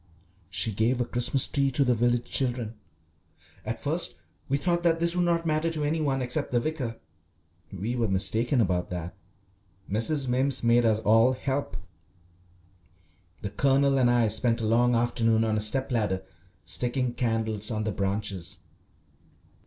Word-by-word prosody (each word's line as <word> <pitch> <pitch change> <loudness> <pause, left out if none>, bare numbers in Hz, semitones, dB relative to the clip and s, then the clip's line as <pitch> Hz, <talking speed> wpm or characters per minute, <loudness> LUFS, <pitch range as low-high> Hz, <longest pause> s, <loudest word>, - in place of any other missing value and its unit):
She 110 - 0
gave 115 +5 +1
a 120 - +1
Christmas 125 +2 +1
Tree 140 -2 0
to 140 - +2
the 125 - +3
village 120 +1 +1
children. 120 -4 -1 0.9
At - - -5
first - - -1 0.3
we 140 - +2
thought 175 +3 0
that 165 -1 +2
this 170 +1 +1
would 180 0 +2
not 170 -1 +1
matter 155 +1 +1
to 155 -2 -2
any 155 +2 0
one 135 -3 0
except 125 0 -2
the 120 - +2
vicar. 130 -4 -4 0.7
We 105 +6 -3
were 115 -2 0
mistaken 115 +6 +1
about 90 -4 0
that. 90 -1 -5 0.7
Mrs. 130 +7 0
Mimms 130 +1 +1
made 120 0 +4
us 110 -2 +3
all 115 +4 +4
help. 130 -4 -3 1.7
The 100 - -4
Colonel 135 +4 +2
and 125 -2 +4
I 120 -2 +3
spent 115 +2 +1
a 115 - -2
long 120 +2 +3
afternoon 115 -1 +2
on 110 -1 0
a - - +1
step 130 +6 -1
ladder 105 -6 0 0.4
sticking 125 0 -1
candles 110 -3 0
on 110 -2 -2
the 110 - -1
branches. 100 -3 -3
120 Hz, 160 wpm, -27 LUFS, 110-135 Hz, 1.7 s, made